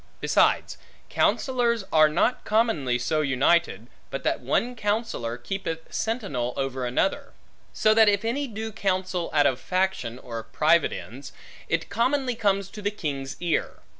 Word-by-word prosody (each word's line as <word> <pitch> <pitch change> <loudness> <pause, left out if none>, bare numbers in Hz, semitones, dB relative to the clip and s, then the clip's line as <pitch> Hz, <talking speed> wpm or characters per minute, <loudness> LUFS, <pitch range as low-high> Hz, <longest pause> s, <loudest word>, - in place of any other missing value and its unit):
Besides, - - +2 0.3
counsellors 240 -5 +1
are 155 -1 +6
not 175 +11 +1
commonly 210 - +1
so 155 +6 0
united, 140 - +2 0.2
but 135 - -5
that - - 0
one 230 - 0
counsellor, 210 - -2
keepeth 165 +4 -5
sentinel 170 - -2
over 135 -2 -2
another; 125 +10 -1 0.4
so 215 0 +3
that 220 -1 +6
if 205 +1 0
any 275 +5 -1
do 220 -1 -5
counsel 185 -4 -1
out 145 -2 +3
of 130 -2 +2
faction 185 -11 -1
or 115 -3 -6
private 155 +7 +2
ends, 135 +5 -8 0.4
it 165 0 -1
commonly 255 +4 +1
comes 200 -3 0
to 210 - -9
the 205 - 0
king's 140 -9 -5
ear. 175 -2 -1
180 Hz, 145 wpm, -25 LUFS, 135-220 Hz, 0.4 s, are